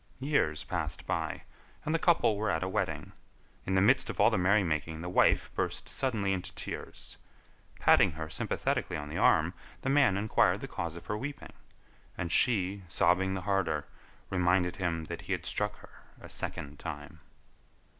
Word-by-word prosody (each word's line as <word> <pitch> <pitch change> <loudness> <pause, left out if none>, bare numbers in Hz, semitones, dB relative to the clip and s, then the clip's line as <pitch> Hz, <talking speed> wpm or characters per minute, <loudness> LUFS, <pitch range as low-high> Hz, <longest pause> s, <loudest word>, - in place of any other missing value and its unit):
Years 130 - +1
passed 80 -4 -3
by, - - -2 0.4
and 155 - 0
the 165 - +2
couple 165 -11 +3
were 105 +1 -1
at 80 0 0
a - - -1
wedding. 90 -7 -2 0.6
In 95 - +1
the 95 - +4
midst 125 +6 +4
of - - -5
all - - +6
the - - +1
merry 100 +3 +4
making 80 -1 -2
the 90 - -4
wife 90 - +3
burst - - -2
suddenly 110 -8 0
into 90 -2 -4
tears. - - -7 0.6
Patting 95 -4 +5
her 80 0 -5
sympathetically 80 - -1
on 75 -1 -6
the - - -3
arm, 80 +3 +4 0.3
the 135 - 0
man 135 -9 +4
inquired 105 +2 +2
the - - -5
cause 85 -1 -4
of 85 - -10
her 105 - -2
weeping, 145 +4 -6 0.6
and 85 -2 -3
she, 100 -5 +2
sobbing 90 +3 +2
the 95 - -3
harder, 95 -7 0 0.5
reminded 90 -1 +2
him 85 -4 -1
that 85 +1 -6
he 90 +3 -3
had 90 -2 -3
struck 105 0 -1
her - - -15 0.3
a - - -11
second 70 0 -5
time. 75 0 -7
90 Hz, 175 wpm, -30 LUFS, 80-105 Hz, 0.6 s, all